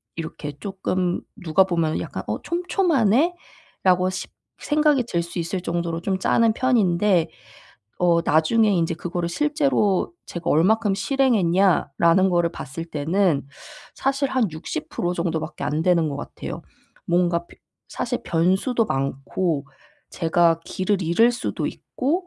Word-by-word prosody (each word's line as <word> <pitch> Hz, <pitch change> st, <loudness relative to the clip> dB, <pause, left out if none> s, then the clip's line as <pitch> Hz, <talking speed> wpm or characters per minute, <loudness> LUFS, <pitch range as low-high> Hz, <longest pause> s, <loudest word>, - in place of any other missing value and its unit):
이렇게 160 Hz, -2 st, -6 dB
쪼끔 185 Hz, -2 st, -2 dB, 0.2 s
누가 170 Hz, +2 st, +4 dB
보면은 165 Hz, -4 st, 0 dB
약간 -, -, -6 dB
어 -, -, -3 dB
'촘촘하네.'라고 310 Hz, -, 0 dB
십 185 Hz, -, -6 dB, 0.3 s
생각이 300 Hz, -3 st, +2 dB
들 170 Hz, -6 st, 0 dB
수 170 Hz, +1 st, -6 dB
있을 170 Hz, +2 st, -3 dB
정도로 170 Hz, -1 st, -2 dB
좀 190 Hz, +1 st, -1 dB
짜는 225 Hz, +3 st, +3 dB
편인데 200 Hz, -8 st, +2 dB, 0.7 s
어 170 Hz, -1 st, +3 dB
나중에 175 Hz, +8 st, +3 dB
인제 165 Hz, -4 st, +1 dB
그거를 170 Hz, +1 st, -3 dB
'실제로 275 Hz, -, +1 dB
제가 175 Hz, -1 st, -5 dB
얼마큼 205 Hz, +6 st, +3 dB
실행했냐.'라는 190 Hz, -, +2 dB
거를 175 Hz, -1 st, +2 dB
봤을 155 Hz, +2 st, -7 dB
때는 160 Hz, -1 st, 0 dB, 0.5 s
사실 275 Hz, +1 st, 0 dB
한 255 Hz, -7 st, +1 dB
60% 165 Hz, +2 st, -4 dB
정도밖에 165 Hz, -2 st, -3 dB
안 150 Hz, +2 st, -1 dB
되는 170 Hz, -3 st, +3 dB
것 140 Hz, -, -4 dB
같아요. 145 Hz, -, -7 dB, 0.4 s
뭔가 175 Hz, -1 st, +1 dB
벼 -, -, -18 dB, 0.3 s
사실 -, -, -3 dB
변수도 190 Hz, +8 st, +1 dB
많고 140 Hz, +3 st, -2 dB, 0.4 s
제가 165 Hz, -1 st, +2 dB
길을 190 Hz, +2 st, -1 dB
잃을 175 Hz, +8 st, +4 dB
수도 240 Hz, -, -3 dB
있고 335 Hz, +8 st, -3 dB
180 Hz, 265 characters per minute, -23 LUFS, 165-225 Hz, 0.7 s, 누가